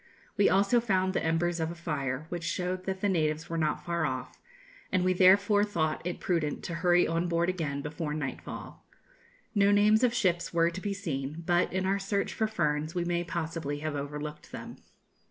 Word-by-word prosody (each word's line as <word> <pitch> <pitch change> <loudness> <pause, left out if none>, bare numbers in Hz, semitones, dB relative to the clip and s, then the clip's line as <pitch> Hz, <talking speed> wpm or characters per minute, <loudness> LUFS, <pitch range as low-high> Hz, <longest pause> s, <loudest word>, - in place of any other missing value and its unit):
We 205 - +4
also 200 +5 +4
found 190 -4 +1
the - - 0
embers 170 +1 +1
of 160 0 -1
a 170 - -6
fire, 140 -4 -3
which 175 -1 -4
showed 180 +2 -2
that 190 -1 -3
the 205 - +2
natives 155 -4 0
were 165 - -1
not 155 -1 -1
far 170 -1 -1
off, - - -4 0.5
and 185 -1 +2
we 185 - +3
therefore 200 +3 +5
thought 160 -7 -1
it 175 +1 -3
prudent 165 -5 -1
to 170 - -4
hurry 175 -1 +4
on 165 +2 0
board 170 +1 +1
again 150 -6 -2
before 150 0 -3
nightfall. 145 -4 -6 0.7
No 200 -2 +4
names 210 +3 +5
of 250 - +4
ships 175 -6 +1
were 170 0 +3
to 190 +2 -6
be 200 0 -2
seen; 155 -4 -4
but, 175 +1 +2
in 185 +1 -1
our 195 +1 +1
search 200 0 -1
for 220 - 0
ferns, 155 -5 -1
we 175 -1 0
may 175 0 0
possibly 165 -4 -3
have 155 -1 -2
overlooked 150 +1 -6
them. - - -8
175 Hz, 195 wpm, -29 LUFS, 155-190 Hz, 0.7 s, therefore